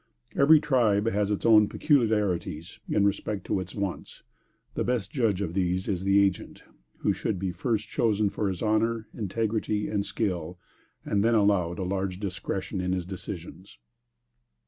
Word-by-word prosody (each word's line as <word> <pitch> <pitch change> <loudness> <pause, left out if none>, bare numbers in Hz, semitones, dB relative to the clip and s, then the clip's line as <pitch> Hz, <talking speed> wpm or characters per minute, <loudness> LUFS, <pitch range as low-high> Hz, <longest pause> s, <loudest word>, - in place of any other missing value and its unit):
Every 150 +3 +6
tribe 115 -8 +2
has 105 -1 0
its 105 - -2
own 105 -2 +6
peculiarities 105 - 0
in 100 - +2
respect 100 -1 -1
to - - 0
its 95 -1 -7
wants, 100 -3 -5 0.5
and - - -5
the - - +2
best 115 -5 -1
judge 110 -8 +1
of 85 -4 -3
these 90 0 0
is 95 -2 -1
the 100 +1 +5
agent, 95 -2 -4 0.4
who - - +2
should 105 - -2
be 95 0 -2
first 110 +2 -2
chosen 105 -2 +1
for 105 - -1
his 95 +1 -4
honor, 110 +1 +1
integrity 110 0 -1
and 100 -2 0
skill, 90 -6 -3 0.5
and 100 -1 +1
then 115 +1 +3
allowed 100 -5 +2
a 95 - -3
large 95 0 -2
discretion 95 0 -4
in 90 0 -1
his 90 -2 -2
decisions. 90 -1 -8
100 Hz, 165 wpm, -27 LUFS, 95-110 Hz, 0.5 s, Every